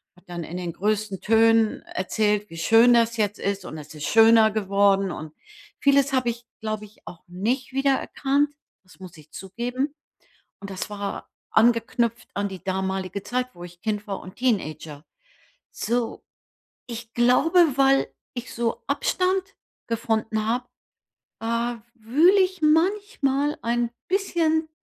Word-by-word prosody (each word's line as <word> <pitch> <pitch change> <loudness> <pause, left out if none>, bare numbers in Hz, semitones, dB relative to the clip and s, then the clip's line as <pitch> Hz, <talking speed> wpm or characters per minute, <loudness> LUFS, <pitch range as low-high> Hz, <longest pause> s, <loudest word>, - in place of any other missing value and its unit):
hat 180 - -22
dann 175 -1 -5
in 170 - -8
den 175 -2 -4
größten 210 -1 -1
Tönen 225 +1 +3
erzählt, 210 +2 -1
wie 165 - -10
schön 225 +8 +5
das 230 0 +3
jetzt 210 -1 0
ist 200 -1 -2
und 160 - -7
es 150 0 -10
ist 150 -1 -5
schöner 225 0 +6
geworden. 195 -2 +2
Und 155 0 -7 0.5
vieles 280 -1 +3
habe 255 -2 +2
ich, 235 +1 -6 0.2
glaube 215 -1 -3
ich, 210 - -20
auch 170 - -10
nicht 230 +10 -2
wiedererkannt, 275 +1 +1 0.3
das 185 0 -20
muss 180 -3 -11
ich 155 0 -17
zugeben. 245 +8 -4 0.7
Und 200 - -8
das 190 +2 -5
war 200 -1 -5 0.2
angeknüpft 230 0 +2
an 200 0 -1
die 190 -1 -10
damalige 190 0 -2
Zeit, 250 +4 -2
wo 175 - -12
ich 175 0 -12
Kind 210 -1 -2
war 195 - -3
und 185 - -11
Teenager. 155 - -2 0.7
So, 235 +1 -2 0.6
ich 230 -1 -8
glaube, 250 +9 +3 0.2
weil 275 0 +4 0.3
ich 245 -1 -7
so 235 -1 -2
Abstand 375 +1 0 0.3
gefunden 220 -1 -1
habe, 245 +2 -1 0.8
äh, - - -5
w 235 0 -1 0.2
wühle 340 - +5
ich 370 -2 -1
manchmal 305 -4 +1
ein 235 0 0 0.2
bisschen, 330 -5 +1
225 Hz, 145 wpm, -24 LUFS, 195-255 Hz, 0.8 s, schöner